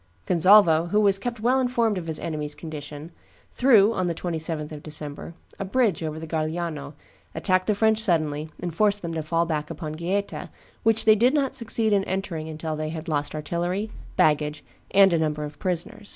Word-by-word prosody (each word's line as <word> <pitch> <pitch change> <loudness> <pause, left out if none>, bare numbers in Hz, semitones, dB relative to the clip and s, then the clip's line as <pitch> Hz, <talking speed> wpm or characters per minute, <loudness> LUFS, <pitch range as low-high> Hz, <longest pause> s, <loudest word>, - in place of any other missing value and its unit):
Gonzalvo, 175 -2 +5
who 210 +4 +2
was 200 -2 +3
kept 240 +1 -4
well 250 +3 +3
informed 240 -4 +1
of 175 -3 -5
his 160 -1 -1
enemies' 150 -2 -4
condition, 150 0 -8 0.4
threw, 230 -5 +5
on 185 -4 -1
the 170 - -2
27th 160 -3 -3
of 150 -1 -8
December, 150 +1 -6 0.2
a - - -2
bridge 205 -2 +1
over 155 -1 -4
the 160 - -6
Garigliano, 155 -2 -3 0.4
attacked 185 -1 +1
the 210 - +2
French 220 +1 +3
suddenly, 155 -7 +1
and 175 -2 -4
forced 205 +2 +1
them 170 -1 -4
to 160 - -2
fall 165 +2 0
back 150 -2 -3
upon 155 -3 -6
Gaeta, 185 +5 -3 0.3
which 225 0 +3
they 220 - +8
did 245 +7 +3
not 275 -3 +1
succeed 225 -3 +2
in 200 -1 +3
entering 180 -4 -3
until 155 0 -4
they 155 0 -3
had 160 +1 -6
lost 145 -2 -2
artillery, 175 +7 -2 0.2
baggage, 150 -1 +1 0.3
and 195 -2 +5
a 165 - +2
number 150 -1 -1
of 150 0 -8
prisoners. 180 +3 -3
170 Hz, 190 wpm, -25 LUFS, 155-205 Hz, 0.4 s, they